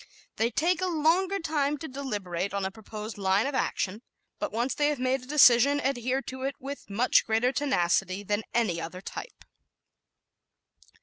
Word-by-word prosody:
They 225 +1 +2
take 340 +9 +1
a 370 - +1
longer 355 +4 +2
time 300 -4 0
to 320 - -7
deliberate 200 - -4
on 200 -1 -1
a 190 - -2
proposed 215 0 -8
line 195 +2 +2
of 285 - -2
action, 210 -5 -1 0.4
but - - -2
once 240 +4 -1
they 290 - +1
have 295 -1 0
made 255 +1 0
a 255 - -13
decision, 280 -1 +6
adhere 265 0 -1
to 260 0 -7
it 270 +1 -2
with 275 -2 -8
much 225 +6 +3
greater 225 +3 +1
tenacity 195 -8 0
than 205 +1 -1
any 205 -8 0
other 170 +3 -7
type. 470 - -8
250 Hz, 170 wpm, -28 LUFS, 205-285 Hz, 0.4 s, decision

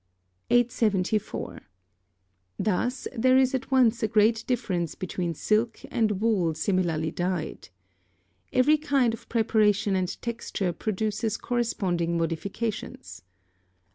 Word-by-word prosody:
874. 215 -4 +1 1.0
Thus, 230 +6 -1
there 255 +2 +4
is 265 0 +3
at 265 0 -2
once 245 -4 +3
a 220 - +2
great 215 +2 +3
difference 180 - -1
between 175 -3 -3
silk 220 +7 +1
and 215 -4 +1
wool 195 -8 +1
similarly 165 -3 0
dyed. 175 - -3 0.8
Every 295 +4 +4
kind 275 -6 +2
of 230 - -9
preparation 215 -3 +2
and 185 -1 -2
texture 210 -6 -3
produces 215 +2 -2
corresponding 180 -8 -1
modifications. 190 +7 -4
215 Hz, 105 wpm, -26 LUFS, 185-235 Hz, 1.0 s, there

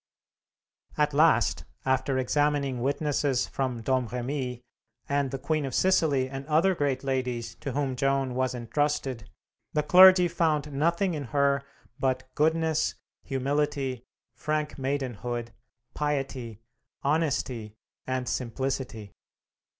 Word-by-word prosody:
At 150 -1 +2
last, 155 +3 +3 0.2
after 130 0 +1
examining 140 -1 +1
witnesses 140 -1 0
from 125 -4 -3
Domremy, 125 0 -2 0.4
and 140 -1 0
the 135 - -4
Queen 155 +3 -1
of 135 -2 -3
Sicily 155 -8 +3
and 135 +1 -6
other 165 +5 +3
great 145 -6 -1
ladies 125 -4 -2
to 140 -4 -4
whom 140 -2 -1
Joan 135 -1 +1
was 130 0 0
intrusted, 130 0 -2 0.4
the 150 - +1
clergy 185 +2 +8
found 155 -4 0
nothing 170 +6 +1
in 145 -3 -4
her 140 +1 +2 0.4
but 130 -1 0
"goodness, 160 +1 +1 0.3
humility, 135 -2 -1 0.3
frank 155 0 -2
maidenhood, 125 -4 -3 0.4
piety, 135 -6 -3 0.4
honesty 135 -7 -1 0.3
and 130 -1 -2
simplicity." 125 -3 -3
135 Hz, 110 wpm, -27 LUFS, 130-150 Hz, 0.4 s, clergy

